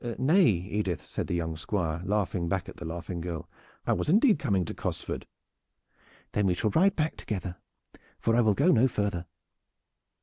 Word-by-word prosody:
"Nay, 165 +7 +5
Edith," 95 -1 -1
said - - -4
the - - -1
young 80 -2 -2
Squire, 80 -1 -2
laughing 95 -4 0
back 95 -1 -1
at - - -10
the 85 - -7
laughing 85 +1 -5
girl. 85 -1 -5 0.4
"I - - +2
was - - -1
indeed 210 - +5
coming 95 -3 +1
to - - -5
Cosford." - - -4 1.0
"Then 105 -1 +1
we 90 - +2
shall 105 +4 0
ride 190 - +4
back 155 0 -1
together, 95 -4 -4 0.6
for 115 - +1
I 120 - +5
will 110 -3 +3
go 165 +6 +4
no 125 -2 +5
farther. 100 -7 -2
100 Hz, 175 wpm, -28 LUFS, 85-120 Hz, 1.0 s, Nay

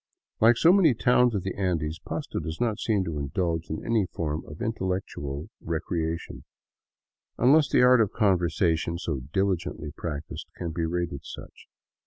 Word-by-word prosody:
Like 115 +2 +6
so 170 +6 +6
many 170 -10 +5
towns 125 0 +3
of 95 - -1
the 95 - -3
Andes, 85 -5 -1
Pasto - - -4
does 80 0 -5
not 115 -3 0
seem 105 -4 +1
to 80 -4 -4
indulge 80 +3 -2
in 80 - -5
any 110 -5 +1
form 80 -2 -3
of 75 - -10
intellectual 95 - -3
recreation; 80 0 -3 0.9
unless 140 +4 +5
the - - +4
art 125 -1 +6
of 105 - +1
conversation, 85 -4 +1
so 80 -5 -3
diligently 90 -5 -1
practiced, 75 -1 -6
can 85 -2 -4
be 80 0 -2
rated 85 -4 -3
such. - - -11
90 Hz, 155 wpm, -27 LUFS, 80-110 Hz, 0.9 s, Like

